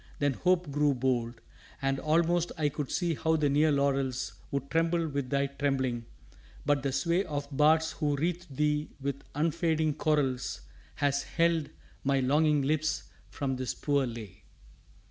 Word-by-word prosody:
Then 145 -1 +1
hope 180 +2 +1
grew 145 0 +2
bold. 120 -2 -1 0.4
And 135 0 0
almost 170 +2 +2
I 150 -2 +2
could 145 -1 -4
see 175 -2 0
how 160 +1 +1
the 150 -3 +2
near 150 +2 +4
laurels 135 -2 0 0.2
Would 140 -1 -3
tremble 165 0 +2
with 140 -3 -3
thy 140 -1 +2
trembling: 135 -4 -1 0.6
but 145 -1 +2
the 135 0 -1
sway 170 +8 +1
Of 145 -5 -4
bards 160 +2 +4
who 145 -2 0
wreathed 170 0 -2
thee 150 0 +1
with 140 0 -3
unfading 160 0 +1
chorals 140 -5 0 0.3
Has 140 -1 +1
held 165 -2 +1 0.3
my 135 0 +2
longing 150 +2 +3
lips 155 +2 -1 0.2
from 135 -2 -2
this 130 -1 -3
poor 140 -3 +1
lay. 115 -5 -8
145 Hz, 150 wpm, -30 LUFS, 135-160 Hz, 0.6 s, near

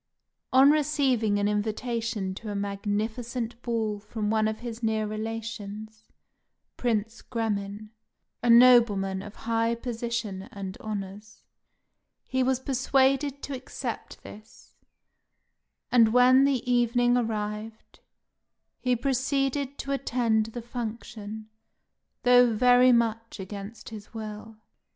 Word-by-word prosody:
On 270 +2 +7
receiving 275 -8 +1
an 205 0 +1
invitation 215 -1 -2
to 215 +3 -8
a 205 - -4
magnificent 220 +4 -3
ball 225 -4 -2
from 210 0 -3
one 220 -1 +2
of 220 +1 -4
his 235 -1 -6
near 220 -1 0
relations, 220 0 -6 0.7
Prince 225 -1 -1
Gremin, 210 -2 -3 0.5
a 240 - 0
nobleman 230 -6 +6
of 210 +1 -10
high 230 0 +1
position 230 -4 -4
and 195 -3 -6
honours, 205 0 -7 0.8
he 260 - -1
was 255 0 +1
persuaded 270 +1 +1
to 280 - -4
accept 255 0 -6
this; 215 +1 -14 1.2
and 230 -3 +5
when 255 +2 +6
the 265 -3 0
evening 245 0 +3
arrived, 220 -1 -4 0.8
he 250 -1 +1
proceeded 275 +2 -1
to 275 - -5
attend 235 -5 +1
the 230 +1 -7
function, 220 -2 -6 0.8
though 245 -1 +6
very 250 +3 +5
much 230 -2 0
against 200 +3 -8
his 220 0 -11
will. 215 0 -7
225 Hz, 110 wpm, -27 LUFS, 210-245 Hz, 1.2 s, On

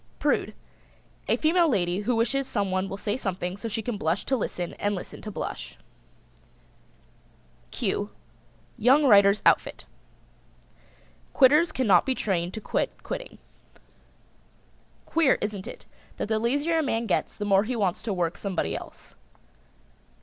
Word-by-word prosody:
PRUDE. - - 0 0.7
A - - +2
female 330 +1 +3
lady 180 -6 +1
who 230 +4 0
wishes 260 +4 0
someone 190 -2 -1
will 195 - -5
say 205 +1 -2
something 185 -6 -3
so 205 +3 -6
she 225 0 -3
can 235 -1 -3
blush 165 +5 -1
to 270 - +1
listen 180 -7 -3
and 205 0 0
listen 180 - -8
to 215 - -7
blush. 210 - -6 1.9
[Illustration: - - -34
"Q 205 -2 -2 0.7
Young 260 +7 +5
writers 200 -4 +5
Outfit."] - - +2 1.5
Quitters 300 +5 +5
cannot 215 - +3
be 260 - +1
trained 180 -5 -1
to - - -4
quit - - -2
quitting. - - -6 1.7
Queer, 325 -5 +3
isn't 205 -2 -4
it, - - -9 0.3
that - - -3
the 220 -1 +1
lazier 285 +8 +1
a - - +3
man 235 -5 -1
gets 195 - -1
the 205 - -4
more 195 -1 +4
he 250 +3 -2
wants 195 -6 0
to 215 - -3
work 175 -2 -1
somebody 195 -4 -2
else. - - -10
210 Hz, 145 wpm, -26 LUFS, 195-260 Hz, 1.9 s, Young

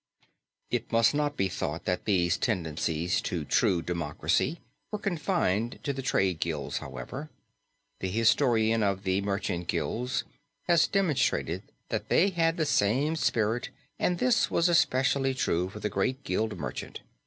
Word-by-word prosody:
It 120 -1 -2
must 115 +2 +4
not 145 0 0
be 95 - +2
thought 85 -3 -4
that 90 -1 -1
these 90 -4 +2
tendencies 85 -5 -1
to 85 -4 -3
true 85 +4 +2
democracy 85 - -1 0.3
were 210 - -3
confined 165 - 0
to 140 - -1
the 135 - -4
trades 95 -9 +1
guilds, 80 -3 -2
however. 70 - -7 0.7
The 95 - -2
historian 115 +1 +3
of 100 -1 0
the 95 0 +1
merchant 100 -4 -2
guilds 125 +2 -1 0.4
has 170 -2 +5
demonstrated 190 -8 +1 0.3
that - - -3
they 195 +3 +4
had 165 -1 +1
the 160 - +1
same 135 +7 +2
spirit 115 -5 0 0.3
and 180 - +1
this 245 +4 +2
was 170 - +2
especially 135 -5 +2
true 90 -7 0
for 105 - -9
the 105 - -1
great 130 +7 -1
guild 105 0 -1
merchant. 70 -6 -6
110 Hz, 145 wpm, -28 LUFS, 90-145 Hz, 0.7 s, has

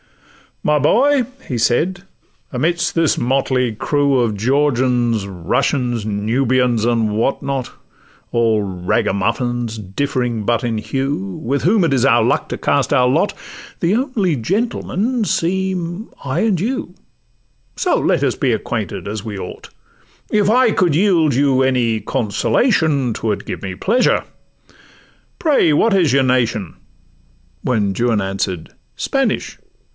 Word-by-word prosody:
'My 150 0 +3
boy!' 255 - +3 0.3
said 140 +11 +1
he, - - -25 0.5
'amidst 170 +6 0
this 165 -2 +2
motley 130 -1 0
crew 140 +4 +1
Of 115 -3 0
Georgians, 125 -3 +1
Russians, 115 - -1
Nubians, 115 +2 +1
and 115 -3 +1
what 115 +5 0
not, 135 -2 -3 0.6
All 115 -2 +2
ragamuffins 110 +5 -1
differing 120 +2 -2
but 115 +2 0
in 115 -2 -1
hue, 135 -7 -3
With 135 +3 -1
whom 195 +4 +3
it 165 - +1
is 130 -1 +2
our 120 -4 +4
luck 120 - +1
to - - -3
cast 140 0 +1
our 125 -3 +4
lot, 155 +10 +1 0.5
The 180 +4 +1
only 230 - 0
gentlemen 220 - -1
seem 185 +1 -2 0.2
I 140 +5 -1
and 210 -6 +1
you; 225 -2 -3 0.8
So - - +1
let - - +1
us - - +1
be - - 0
acquainted, - - -3
as 105 0 -4
we 105 -3 -5
ought: 90 - -8 0.6
If 210 -2 +2
I 250 +1 +4
could 175 -7 +2
yield 170 -5 +3
you 135 -1 +3
any 120 -4 +1
consolation, 140 - +1
'Twould 105 -2 -3
give - - -5
me 95 -1 -4
pleasure.—Pray, 245 - -2
what 210 +7 +3
is 170 -9 +3
your 140 - +4
nation?' 115 -7 0 0.9
When 105 -6 0
Juan 115 0 +1
answer'd—'Spanish! 95 -3 -3
130 Hz, 130 wpm, -18 LUFS, 115-170 Hz, 0.9 s, our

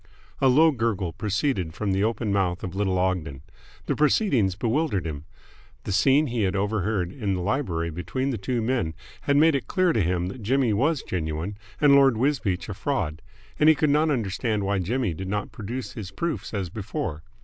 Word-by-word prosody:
A 135 - +4
low 155 +5 +6
gurgle 110 - -1
proceeded 100 - -1
from 105 +1 -1
the 95 +1 +1
open 110 -1 0
mouth 95 -3 0
of 90 - -4
little 95 -1 0
Ogden. 90 -7 -1 0.4
The - - 0
proceedings 140 - +2
bewildered 115 - 0
him. 75 -2 -5 0.6
The - - -4
scene 135 +9 +4
he 120 -4 -2
had 95 -2 +1
overheard 100 -2 0
in 100 -4 -2
the 90 - -3
library 90 - -1
between 130 - -2
the 115 - -3
two 115 +4 -1
men 110 -10 -1 0.3
had 140 - +5
made 160 +2 +5
it 140 - -2
clear 185 -3 +2
to 110 - +2
him 90 0 0
that 120 +5 -8
Jimmy 125 +1 +2
was 140 +7 +1
genuine 80 +3 -3 0.2
and 145 -2 +6
Lord 135 -4 +6
Wisbeach 115 -8 0
a 105 - -4
fraud, 95 - -2 0.4
and 155 - +6
he 160 - +6
could 150 -1 +2
not 155 +2 +3
understand 110 -4 -1
why 100 0 0
Jimmy 110 +1 -1
did 95 +4 -6
not 105 +2 -3
produce 115 +5 -5
his 105 -5 -7
proofs 170 - -3
as 95 -5 -3
before. 95 -6 -4
105 Hz, 195 wpm, -25 LUFS, 95-135 Hz, 0.6 s, low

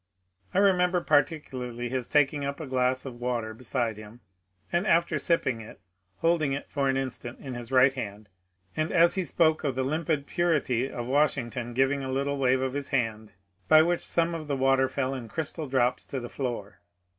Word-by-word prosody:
I - - -3
remember 180 -2 +4
particularly 135 -6 0
his 125 -1 -2
taking 145 -1 +2
up 140 +2 -3
a 160 - -5
glass 130 0 0
of 125 -3 -8
water 120 -3 -2
beside 115 -1 -2
him, 110 +3 -12 0.5
and 175 +5 +1
after 165 -3 +3
sipping 130 -7 +1
it 110 - -12 0.4
holding 165 -4 +1
it 140 - -6
for 140 -2 0
an 135 - +1
instant 130 -2 -5
in 135 -2 -7
his 120 0 -7
right 130 +1 +5
hand, 105 -5 -6 0.5
and 155 0 -1
as 170 -1 +5
he 190 - 0
spoke 160 -2 +2
of 140 -4 -1
the 130 - 0
limpid 150 +1 -1
purity 140 -7 0
of 120 -1 -5
Washington 125 -4 0
giving 135 +2 +2
a 130 - -3
little 140 +1 -1
wave 130 -1 +3
of 130 -1 -1
his 140 -1 -3
hand 110 -6 -2 0.3
by 155 0 +7
which 175 +1 +1
some 170 0 +1
of 160 -2 -5
the 140 -2 -1
water 135 0 +3
fell 130 0 -1
in 125 -4 -6
crystal 155 +2 -4
drops 130 -2 +1
to 135 - -4
the 120 -1 -7
floor. 115 -6 -5
135 Hz, 190 wpm, -27 LUFS, 125-155 Hz, 0.5 s, by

